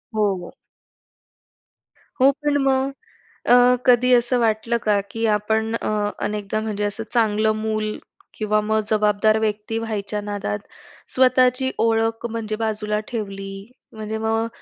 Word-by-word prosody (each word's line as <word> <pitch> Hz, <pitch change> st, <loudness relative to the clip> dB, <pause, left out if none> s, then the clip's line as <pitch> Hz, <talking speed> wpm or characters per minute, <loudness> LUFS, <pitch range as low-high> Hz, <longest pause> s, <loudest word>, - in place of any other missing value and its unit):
हो, 205 Hz, -2 st, +2 dB
हो. -, -, -9 dB, 1.7 s
हो, 265 Hz, +2 st, +6 dB
पण 290 Hz, +1 st, -1 dB
मग 270 Hz, 0 st, +1 dB, 0.6 s
अ, -, -, +7 dB, 0.3 s
कधी 250 Hz, 0 st, +4 dB
असं 245 Hz, +1 st, +3 dB
वाटलं 230 Hz, +1 st, +1 dB
का 210 Hz, -1 st, +2 dB
की 225 Hz, +1 st, -2 dB
आपण 220 Hz, +2 st, -1 dB
अ, -, -, -3 dB, 0.4 s
अनेकदा 210 Hz, 0 st, -2 dB
म्हणजे 210 Hz, -2 st, -3 dB
असं 205 Hz, +2 st, -2 dB
चांगलं 220 Hz, -2 st, +2 dB
मूल 215 Hz, 0 st, -2 dB, 0.4 s
किंवा 215 Hz, -1 st, 0 dB
मग 220 Hz, +1 st, +1 dB
जबाबदार 215 Hz, 0 st, +3 dB
व्यक्ती 215 Hz, +1 st, -2 dB
व्हायच्या 210 Hz, -2 st, -3 dB
नादात 205 Hz, 0 st, -3 dB, 0.5 s
स्वतःची 255 Hz, 0 st, +3 dB
ओळख 225 Hz, 0 st, 0 dB
म्हणजे 220 Hz, -1 st, -3 dB
बाजूला 210 Hz, -1 st, -1 dB
ठेवली? 195 Hz, -4 st, -5 dB, 0.4 s
म्हणजे 220 Hz, 0 st, -5 dB
मग 225 Hz, +1 st, 0 dB
220 Hz, 125 wpm, -22 LUFS, 210-230 Hz, 1.7 s, अ